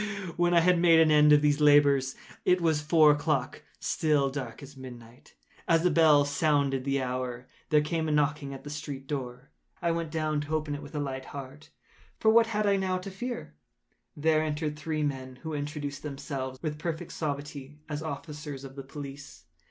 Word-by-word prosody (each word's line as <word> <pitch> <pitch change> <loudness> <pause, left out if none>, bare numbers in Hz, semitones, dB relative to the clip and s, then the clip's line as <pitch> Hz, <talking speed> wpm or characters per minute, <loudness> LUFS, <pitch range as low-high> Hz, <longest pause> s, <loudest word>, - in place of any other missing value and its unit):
When 175 0 +2
I 170 - +6
had 180 +1 +4
made 170 -1 +6
an 160 -1 +5
end 150 0 +6
of 150 0 +6
these 145 0 +2
labors, 140 -3 +5 0.3
it 180 0 +3
was 160 -3 +1
four 155 0 +5
o’clock—still 145 0 0
dark 130 -2 -6
as 140 +1 -12
midnight. 120 -2 -12 0.3
As 165 -1 +3
the 180 - +3
bell 150 -3 +5
sounded 140 -2 +1
the 140 0 +1
hour, 125 -1 -4 0.2
there 150 -1 +4
came 160 +1 -1
a - - 0
knocking 150 -1 0
at 135 - -8
the 145 - -7
street 145 -2 -6
door. 130 -2 -6 0.3
I 170 - 0
went 165 -1 -2
down 155 -1 -1
to 150 +2 -3
open 155 -1 -2
it 145 - -5
with 145 +1 -11
a - - -1
light 135 -2 -4
heart,—for 145 +9 -5
what 230 0 +5
had 210 -1 -1
I 200 -1 +3
now 190 -1 0
to 185 +2 -7
fear? 240 - -6 0.6
There 155 +1 +3
entered 150 -1 -2
three 155 0 -3
men, 130 -3 -3
who 160 -1 -4
introduced 145 -1 -4
themselves, 140 -3 -5
with 150 -2 -3
perfect 160 -1 -4
suavity, 145 -1 -5
as 150 -1 -4
officers 150 -2 -6
of 135 -1 -10
the 140 - -6
police. 135 - -9
150 Hz, 185 wpm, -28 LUFS, 140-160 Hz, 0.6 s, I